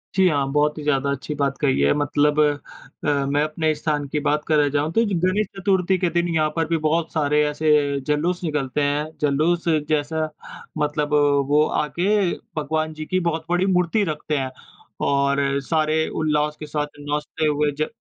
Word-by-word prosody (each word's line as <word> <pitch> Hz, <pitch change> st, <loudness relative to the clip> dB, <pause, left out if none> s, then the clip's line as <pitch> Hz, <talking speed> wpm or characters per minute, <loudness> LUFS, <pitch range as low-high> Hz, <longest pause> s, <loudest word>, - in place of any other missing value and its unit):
जी, 190 Hz, 0 st, +5 dB
हाँ। 140 Hz, -3 st, 0 dB
बहुत 150 Hz, +1 st, +1 dB
ही 150 Hz, -, -6 dB
ज़्यादा 140 Hz, -1 st, +1 dB
अच्छी 140 Hz, +1 st, -4 dB
बात 140 Hz, -1 st, -1 dB
कही 140 Hz, -, +2 dB
है। 70 Hz, -, +4 dB
मतलब 145 Hz, +1 st, +1 dB
अ, 145 Hz, -1 st, -1 dB
मैं 145 Hz, +1 st, +1 dB
अपने 155 Hz, +1 st, 0 dB
स्थान 150 Hz, -1 st, -2 dB
की 150 Hz, +2 st, -2 dB
बात 150 Hz, +1 st, +1 dB
करे 150 Hz, -2 st, +3 dB
जाऊँ 150 Hz, +2 st, 0 dB
तो 225 Hz, -, +3 dB
ये 205 Hz, -4 st, 0 dB
गणेश 185 Hz, +5 st, +1 dB
चतुर्थी 190 Hz, -1 st, +1 dB
के 180 Hz, -1 st, 0 dB
दिन 170 Hz, +1 st, 0 dB
यहाँ 155 Hz, -1 st, +2 dB
पर 165 Hz, -1 st, +1 dB
भी 165 Hz, -, +1 dB
बहुत 160 Hz, +1 st, +1 dB
सारे 150 Hz, -1 st, +2 dB
ऐसे 150 Hz, +1 st, 0 dB, 0.4 s
जुलूस 165 Hz, +5 st, 0 dB
निकलते 150 Hz, -3 st, -1 dB
हैं। 145 Hz, +1 st, 0 dB, 0.2 s
जुलूस 155 Hz, +5 st, +1 dB, 0.2 s
जैसा 155 Hz, +1 st, 0 dB, 0.5 s
मतलब 150 Hz, 0 st, -1 dB, 0.4 s
वो 150 Hz, +1 st, +4 dB
आ 150 Hz, -, -1 dB
के 195 Hz, -1 st, +2 dB, 0.3 s
भगवान 155 Hz, +1 st, -1 dB
जी 155 Hz, 0 st, -7 dB
की 185 Hz, +3 st, 0 dB
बहुत 160 Hz, -1 st, -2 dB
बड़ी 180 Hz, +1 st, +2 dB
मूर्ति 180 Hz, +2 st, +2 dB
रखते 150 Hz, 0 st, -3 dB
हैं। 130 Hz, -1 st, -2 dB, 0.5 s
और 140 Hz, 0 st, +2 dB, 0.2 s
सारे 155 Hz, +2 st, +1 dB
उल्लास 150 Hz, -1 st, 0 dB
के 155 Hz, -, -6 dB
साथ 150 Hz, 0 st, -2 dB
नाचते 150 Hz, +2 st, -3 dB
हुए 150 Hz, 0 st, +1 dB
ज 155 Hz, -, +1 dB
150 Hz, 185 wpm, -22 LUFS, 145-165 Hz, 0.5 s, जी